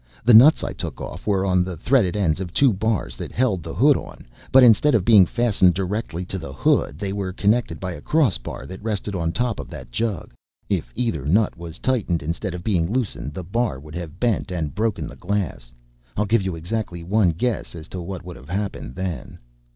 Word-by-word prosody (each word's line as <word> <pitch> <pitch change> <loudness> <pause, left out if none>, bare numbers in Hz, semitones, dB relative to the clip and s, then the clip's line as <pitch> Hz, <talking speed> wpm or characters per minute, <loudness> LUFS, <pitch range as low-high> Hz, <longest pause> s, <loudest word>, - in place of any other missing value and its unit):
The 120 - +6
nuts 130 +8 +8
I - - -3
took - - -6
off - - -8
were 100 -2 +2
on 90 -1 +3
the 90 -2 -5
threaded 110 - +2
ends 85 -6 +1
of 90 -3 -5
two 135 +4 +4
bars 100 - -1
that - - -6
held 115 -8 +1
the - - -7
hood - - +5
on, - - -8 0.3
but 130 0 +8
instead 125 +5 +6
of 100 -5 +1
being 105 -6 +7
fastened 105 -6 +3
directly 95 -2 -3
to 95 +1 -5
the 80 -5 -7
hood 70 +1 +1
they 100 +2 -3
were 100 -2 -3
connected 100 -2 +1
by 90 -1 -4
a 75 - -8
crossbar 130 - 0
that 95 +7 -9
rested 105 -2 -3
on 85 -3 -1
top 120 +1 -1
of - - -7
that 65 -1 -10
jug. 105 - -3 0.4
If - - -1
either 115 - -1
nut 100 +9 +2
was 85 -1 -8
tightened 100 - 0
instead 85 +4 -3
of 90 - -7
being 90 -4 0
loosened, 105 - -2
the 95 - -5
bar 105 - -1
would 75 +2 -12
have 85 -2 -7
bent 115 -6 0
and 80 -5 -3
broken 110 0 -1
the - - -9
glass. 90 -10 -3 0.5
I'll 105 - +2
give 115 +1 +2
you 95 -2 -3
exactly 85 0 -4
one 100 +1 +3
guess 105 +4 -2
as 80 -1 -9
to 90 - -5
what 90 0 -6
would 90 -1 -8
have 65 +3 -14
happened 95 -9 -4
then." 90 -3 -5
95 Hz, 215 wpm, -22 LUFS, 85-110 Hz, 0.5 s, nuts